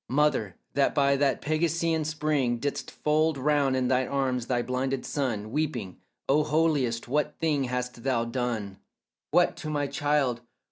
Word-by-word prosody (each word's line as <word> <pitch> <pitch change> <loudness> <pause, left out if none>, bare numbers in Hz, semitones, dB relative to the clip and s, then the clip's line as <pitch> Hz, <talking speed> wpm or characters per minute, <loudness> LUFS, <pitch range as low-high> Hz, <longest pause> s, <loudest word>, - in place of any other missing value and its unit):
Mother, 130 -9 +1 0.2
that 140 -1 +2
by 140 -1 +4
that 140 -1 +1
Pegasean 160 +1 0
spring 150 -5 0
Didst 140 +4 -3
fold 155 0 +1
round 140 -1 +2
in 130 -1 +1
thine 130 0 +2
arms 130 -3 -1
thy 120 -2 0
blinded 130 +1 -2
son, 110 -7 -2
Weeping 125 - -2 0.3
"O 150 +3 +4
holiest, 150 -7 +1
what 150 +4 0
thing 150 -4 +1
hast 125 -1 -3
thou 120 -2 0
done, 115 -5 -3 0.5
What, - - +3
to 155 - -5
my 145 -1 0
child? 140 -3 0
135 Hz, 150 wpm, -27 LUFS, 125-150 Hz, 0.5 s, by